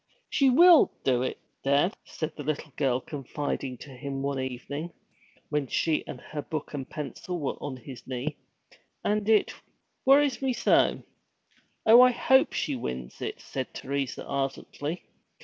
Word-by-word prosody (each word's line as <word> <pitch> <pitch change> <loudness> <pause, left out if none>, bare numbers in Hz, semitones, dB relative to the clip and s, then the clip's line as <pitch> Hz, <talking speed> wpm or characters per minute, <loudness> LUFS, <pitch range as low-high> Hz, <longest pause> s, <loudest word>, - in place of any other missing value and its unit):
'She 275 -2 +4
will 340 +5 +7
do 125 -2 +2
it, 130 - -2 0.3
dad!' 140 +7 +3 0.2
the 155 - -2
little 150 -1 -3
girl 130 -3 +1
confided 135 -2 -4
to 145 - -10
him 135 +1 -5
one 140 -1 -1
evening, 130 +5 -4 0.6
when 150 -2 0
she 155 +4 +1
and - - -7
her 150 - -6
book 155 0 -5
and 135 -2 -4
her - - -34
pencil 150 +5 -5
were 145 - -1
on 140 -3 -4
his 130 0 -11
knee. 130 +4 -3 0.7
'And 210 0 0
it 215 -2 +4 0.5
worries 275 0 +4
me 265 -1 +1
so.' - - +3 0.8
'Oh, 230 +3 +9
I 255 - +8
hope 265 +2 +4
she 145 - -1
wins 65 - -5
it,' - - -4
said 130 -2 -5
Teresa 140 -1 -3
ardently. 140 +3 -3
145 Hz, 150 wpm, -28 LUFS, 135-180 Hz, 0.8 s, Oh